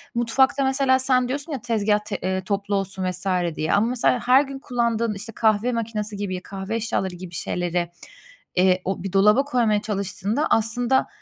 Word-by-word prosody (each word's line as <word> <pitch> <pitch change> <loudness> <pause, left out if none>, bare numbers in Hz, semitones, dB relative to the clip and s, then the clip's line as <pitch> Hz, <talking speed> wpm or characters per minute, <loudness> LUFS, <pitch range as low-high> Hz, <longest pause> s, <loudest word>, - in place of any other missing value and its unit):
mutfakta 265 +4 +2
mesela 265 -1 +2
sen 255 -1 +3
diyorsun 285 +5 -3
ya, 270 -6 -4
"Tezgâh 215 -3 +1
t 205 - -3
eee, 190 0 -1
toplu 200 +1 -2
olsun." 195 -1 -2
vs. 180 +2 -7 0.3
diye 155 - -1
ama 215 +3 +3
mesela 250 0 +2
her 255 +2 +6
gün 275 -1 -8
kullandığın, 235 -3 -1
işte, 210 +3 -8
kahve 220 +2 +2
makinası 215 -2 -2
gibi, 190 -3 -4
kahve 195 +2 -5
eşyaları 205 -5 -2
gibi 175 0 -10
şeyleri, 175 -1 -2 0.7
eee, 185 0 +3
o 190 -1 -3
bir 195 - -5
dolaba 210 +7 +5
koymaya 230 -6 +1
çalıştığında 205 - -2
aslında, 235 +3 +2
215 Hz, 170 wpm, -23 LUFS, 195-245 Hz, 0.7 s, her